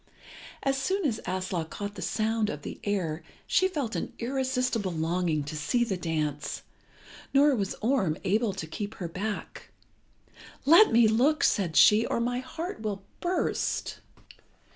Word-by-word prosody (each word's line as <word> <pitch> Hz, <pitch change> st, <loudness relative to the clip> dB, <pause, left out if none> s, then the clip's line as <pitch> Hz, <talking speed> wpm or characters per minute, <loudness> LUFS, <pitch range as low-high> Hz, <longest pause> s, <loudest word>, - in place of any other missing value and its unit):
As 270 Hz, 0 st, +1 dB
soon 385 Hz, +4 st, 0 dB
as 235 Hz, -6 st, 0 dB
Aslog 185 Hz, -3 st, -2 dB
caught 205 Hz, 0 st, -5 dB
the -, -, -8 dB
sound 220 Hz, 0 st, 0 dB
of -, -, -6 dB
the -, -, -7 dB
air 175 Hz, -6 st, -1 dB, 0.2 s
she 375 Hz, -, +3 dB
felt 285 Hz, -11 st, -3 dB
an -, -, -3 dB
irresistible 250 Hz, -5 st, -1 dB
longing 165 Hz, -1 st, 0 dB
to 145 Hz, +2 st, -6 dB
see 240 Hz, -, +1 dB
the 210 Hz, -5 st, -1 dB
dance, 155 Hz, -4 st, -3 dB, 0.7 s
nor 285 Hz, 0 st, +6 dB
was 200 Hz, -4 st, -2 dB
Orm 215 Hz, -, +1 dB
able 215 Hz, +3 st, +1 dB
to 185 Hz, -4 st, -5 dB
keep 205 Hz, +7 st, -6 dB
her 180 Hz, -, -4 dB
back. 205 Hz, +5 st, -5 dB, 1.0 s
"Let 335 Hz, +9 st, +7 dB
me 230 Hz, 0 st, +6 dB
look," 255 Hz, +8 st, +3 dB
said 175 Hz, -6 st, +2 dB
she, 210 Hz, +2 st, +7 dB
"or -, -, -1 dB
my 245 Hz, +1 st, 0 dB
heart 320 Hz, -, -6 dB
will 205 Hz, -3 st, -3 dB, 0.2 s
burst." 355 Hz, +1 st, -1 dB
215 Hz, 150 wpm, -28 LUFS, 180-255 Hz, 1.0 s, Let